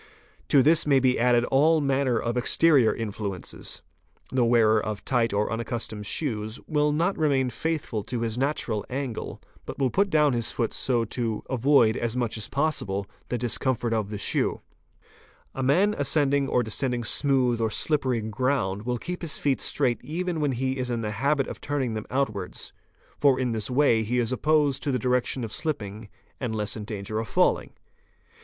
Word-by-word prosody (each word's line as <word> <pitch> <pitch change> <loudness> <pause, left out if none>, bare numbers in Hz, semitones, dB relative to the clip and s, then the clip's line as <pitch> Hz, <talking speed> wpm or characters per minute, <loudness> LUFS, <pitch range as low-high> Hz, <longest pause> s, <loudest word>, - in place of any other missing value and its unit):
'T'o 140 -3 +5
this 155 +2 +4
may 140 -2 +5
be 130 -1 +2
added 120 0 +3
all 155 +4 +4
manner 135 -3 +1
of 115 +1 -2
exterior 130 0 +4
influences: 100 -4 -6 0.5
the 130 -2 +2
wearer 110 -2 +4
of 105 -1 -5
tight 120 -3 +1
or 105 +2 0
unaccustomed 115 -3 -4
shoes, 110 -5 -1
will 150 -1 +1
not 170 +6 +1
remain 135 -5 +2
faithful 155 -9 -2
to 120 +2 -4
his 115 -2 -2
natural 125 -5 -1
angle, 130 -3 -4 0.2
but - - -7
will 135 -3 +1
put 200 +1 +2
down 150 -4 +3
his 115 -2 +1
foot 115 -2 -2
so 120 -3 0
to 115 -1 -3
avoid 130 -3 +4
as 120 +1 -2
much 120 -3 -1
as 110 -2 -5
possible 135 -10 -1 0.2
the 125 - -1
discomfort 120 0 0
of 110 -3 -1
the 105 - -4
shoe. 100 - 0 0.9
"A 135 - -4
man 180 +11 +3
ascending 140 -5 +2
or 125 - +2
descending 120 +2 -1
smooth 125 -2 +2
or 110 - +1
slippery 130 -1 0
ground 110 -2 -1
will 125 0 0
keep 180 +8 -6
his 165 -4 -1
feet 140 -2 0
straight 120 -1 0
even 175 +2 -3
when 145 -3 0
he 130 +2 -2
is 125 -1 -2
in 120 -1 -2
the 105 -1 -3
habit 135 +6 +1
of - - -8
turning 135 -5 -2
them 110 -1 -5
out 135 -1 0
wards, 95 -3 -6 0.5
for 140 -3 +4
in 125 -2 0
this 110 -1 -3
way 125 -3 +3
he 115 +3 -1
is 120 -1 +1
opposed 145 +1 +2
to 145 - -1
the 130 - +1
direction 125 +1 0
of 110 - -5
shipping 110 -9 -4 0.3
and 120 -4 -3
less 105 -1 -1
in 105 -2 -6
danger 105 0 -4
of 115 - -4
falling. - - +1
125 Hz, 185 wpm, -26 LUFS, 110-140 Hz, 0.9 s, T'o